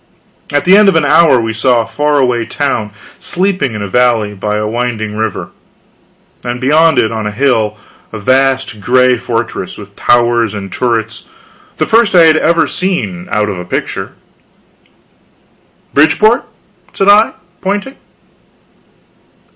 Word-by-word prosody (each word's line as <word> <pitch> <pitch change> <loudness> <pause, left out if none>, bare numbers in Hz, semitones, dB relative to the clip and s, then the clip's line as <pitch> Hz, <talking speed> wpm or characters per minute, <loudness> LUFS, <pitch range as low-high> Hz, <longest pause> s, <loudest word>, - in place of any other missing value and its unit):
At 145 0 0
the 185 +2 +6
end 210 -1 +6
of 190 - +1
an 160 -2 +2
hour 150 -2 +4
we 115 -1 -2
saw 120 +2 +2
a - - -5
far 145 +5 -1
away 125 -3 +1
town 120 -4 -2 0.3
sleeping 180 - -1
in 105 - -4
a - - -4
valley 115 -1 +1
by 105 +1 -3
a 105 - -2
winding 110 -2 -3
river; 110 -2 -3 0.9
and 120 0 -4
beyond 155 +5 +3
it 110 - +2
on 110 -1 -3
a - - -3
hill, 110 -3 0 0.3
a 110 - -6
vast 130 0 0
gray 125 +3 +3
fortress, 115 -5 -4
with 100 -1 -12
towers 120 -3 +1
and 100 -2 -7
turrets, 115 -2 -2 0.5
the - - 0
first 225 -3 +2
I 175 - +7
had 155 -1 +4
ever 165 +1 +2
seen 105 - -3
out 105 0 0
of 100 -3 -4
a - - -5
picture. - - -4 1.8
"Bridgeport?" 160 - +3 0.5
said 195 - -1
I, 210 +2 +5 0.3
pointing. 205 +7 -3
125 Hz, 145 wpm, -12 LUFS, 110-155 Hz, 1.8 s, I